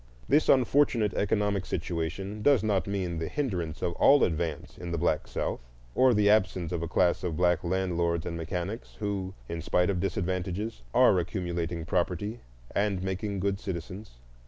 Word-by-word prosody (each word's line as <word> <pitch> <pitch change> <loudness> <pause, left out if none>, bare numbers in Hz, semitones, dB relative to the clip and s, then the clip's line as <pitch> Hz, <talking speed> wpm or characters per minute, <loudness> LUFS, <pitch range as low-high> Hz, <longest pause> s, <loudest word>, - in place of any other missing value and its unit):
This 155 - +3
unfortunate 125 -4 +3
economic 105 -2 0
situation 95 +4 -3
does 135 -3 +4
not 100 -3 +1
mean 95 -4 -2
the 80 - -2
hindrance 90 - -3
of 85 - 0
all 145 0 +6
advance 80 -2 -2
in 85 - -6
the 85 - -1
black 80 -2 0
South, - - -2 0.3
or 130 -2 +4
the 105 0 +3
absence 95 -5 +2
of 85 -2 -2
a 85 - -2
class 90 +2 +2
of 85 -4 -2
black 90 -1 +2
landlords 85 -2 0
and 85 - -3
mechanics 90 +6 -4
who, 100 -3 -3
in 85 0 -4
spite 90 +3 +2
of 90 - -2
disadvantages, 95 +4 -2
are 120 -6 +5
accumulating 85 -2 -3
property 90 +6 -1 0.3
and 100 -2 0
making 95 +1 -3
good 100 0 0
citizens. 95 - -6
95 Hz, 160 wpm, -28 LUFS, 85-105 Hz, 0.3 s, all